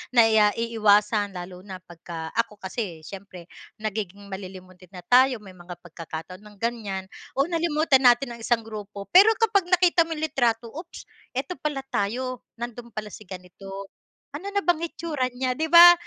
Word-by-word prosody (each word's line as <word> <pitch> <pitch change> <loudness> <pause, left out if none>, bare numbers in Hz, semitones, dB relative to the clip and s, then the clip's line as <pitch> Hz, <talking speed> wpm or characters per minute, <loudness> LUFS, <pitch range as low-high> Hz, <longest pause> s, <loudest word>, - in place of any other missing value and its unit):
naiiwasan 215 -2 +4
lalo 180 0 -7
na 185 -1 -8
pagka 165 -1 -8
ako 230 -2 -1
kasi 185 -5 -4
siyempre 185 -2 -10 0.2
nagiging 205 -2 -4
malilimutin 185 -1 -9
na 180 - -9
tayo, 255 +5 +5
may 195 - -11
mga 175 0 -9
pagkakataon 165 +1 -8
ng 210 0 -15
ganyan 215 -5 -3 0.3
o 275 - +3
nalimutan 320 -4 +2
natin 245 +1 +4
ang - - -14
isang 230 0 +1
grupo. 210 -2 -7
Pero 415 +5 +8
kapag 410 -5 +2
nakita 360 -2 +4
mo 325 - -3
yung 310 - -5
litrato 230 -2 0
oops 335 +3 -9 0.3
eto 270 +7 -3
pala 290 -3 -2
tayo, 250 +5 -1 0.2
nandun 240 0 -7
pala 215 -1 -5
si 215 - -11
ganito 195 +2 -9 0.4
ano 360 +8 -5
na 405 0 -1
bang 345 -2 +2
itsura 320 -6 -2
niya 255 +1 -1
di 315 +5 -2
ba? 345 +1 +11
225 Hz, 160 wpm, -25 LUFS, 195-275 Hz, 0.4 s, ba